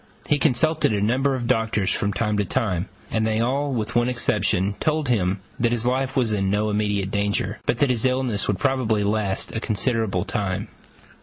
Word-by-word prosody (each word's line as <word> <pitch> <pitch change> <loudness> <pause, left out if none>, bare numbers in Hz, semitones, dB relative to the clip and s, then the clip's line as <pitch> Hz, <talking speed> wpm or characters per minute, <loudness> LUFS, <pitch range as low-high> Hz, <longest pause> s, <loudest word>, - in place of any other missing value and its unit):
He 150 -2 +2
consulted 155 +1 +2
a 105 - +1
number 130 +6 +1
of 125 -2 -3
doctors 110 -4 +1
from 100 - 0
time 105 0 -1
to 105 - +2
time, 95 -1 -1 0.2
and 110 0 +1
they 110 0 0
all, 135 +5 0
with 115 -2 -2
one 120 0 +2
exception, 105 -5 +1
told 155 -3 0
him 95 -4 +1 0.2
that 120 0 +2
his 120 -1 0
life 130 +2 0
was 125 -5 +2
in 95 -2 0
no 105 +2 +1
immediate 105 -2 0
danger, 100 0 -1
but - - +2
that 140 +1 +3
his 115 -3 0
illness 130 -5 0
would 100 - 0
probably 125 -6 +1
last 100 -1 -1
a - - 0
considerable 110 -4 0
time. 100 -5 -2
110 Hz, 190 wpm, -23 LUFS, 100-125 Hz, 0.2 s, that